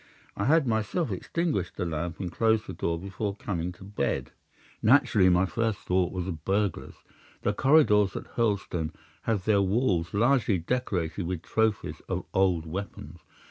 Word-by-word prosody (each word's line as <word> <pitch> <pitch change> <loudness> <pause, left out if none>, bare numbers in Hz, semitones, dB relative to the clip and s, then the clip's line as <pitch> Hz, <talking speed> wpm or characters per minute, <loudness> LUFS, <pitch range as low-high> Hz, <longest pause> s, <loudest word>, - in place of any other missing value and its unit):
I 100 - -2
had 155 +1 +4
myself 115 - 0
extinguished 150 - -2
the - - -1
lamp 85 0 -3
and 90 -3 -4
closed 110 +2 +2
the - - -6
door 85 0 -2
before 100 +2 -4
coming 90 -4 -3
to 90 - -14
bed. 100 +2 -2 0.5
Naturally 115 -6 +5
my 90 +1 +4
first 110 +3 -1
thought 90 -1 +1
was 90 -2 -3
of 80 -5 -5
burglars. 100 -1 -1 0.5
The 100 - +1
corridors 105 -7 +4
at - - -7
Hurlstone 100 -8 -1 0.3
have 105 -5 0
their 105 -2 +4
walls 95 -4 +1
largely 120 -1 +3
decorated 90 -3 -2
with 90 -2 -3
trophies 110 -2 0
of - - -2
old 90 -4 +2
weapons. 95 +1 -7
100 Hz, 155 wpm, -27 LUFS, 90-110 Hz, 0.5 s, Naturally